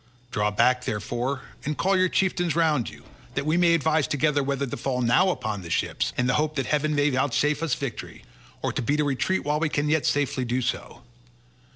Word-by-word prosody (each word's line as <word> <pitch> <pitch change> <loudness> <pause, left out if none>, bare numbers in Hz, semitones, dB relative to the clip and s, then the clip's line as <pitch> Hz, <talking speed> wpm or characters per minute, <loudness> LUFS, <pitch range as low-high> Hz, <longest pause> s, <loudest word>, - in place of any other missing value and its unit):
Draw 105 0 +1
back, 125 +4 +2
therefore, 120 +6 -3 0.2
and 150 +1 -3
call 195 +2 +2
your 185 0 +3
chieftains 175 -3 0
round 155 -7 +2
you, 75 -1 -14 0.3
that - - -1
we 155 +2 +2
may 170 -1 +4
advise 160 -1 +1
together 145 0 +1
whether 140 0 -1
to 125 - -5
fall 125 +1 -2
now 120 +11 +4
upon 110 - -3
the 85 - -9
ships - - -1
in 125 - +1
the 125 - +2
hope 155 0 0
that 135 -3 -1
heaven 150 +2 0
may 145 0 +2
vouchsafe 145 +3 +1
us 165 -6 0
victory, 135 -5 -6 0.4
or - - -1
to - - -2
beat 145 +6 0
a - - +2
retreat 145 +7 0
while 150 +1 +1
we 160 -1 0
can 145 0 0
yet 155 -1 +2
safely 140 -2 0
do 125 +1 -1
so. 125 - -4
145 Hz, 215 wpm, -25 LUFS, 125-155 Hz, 0.4 s, may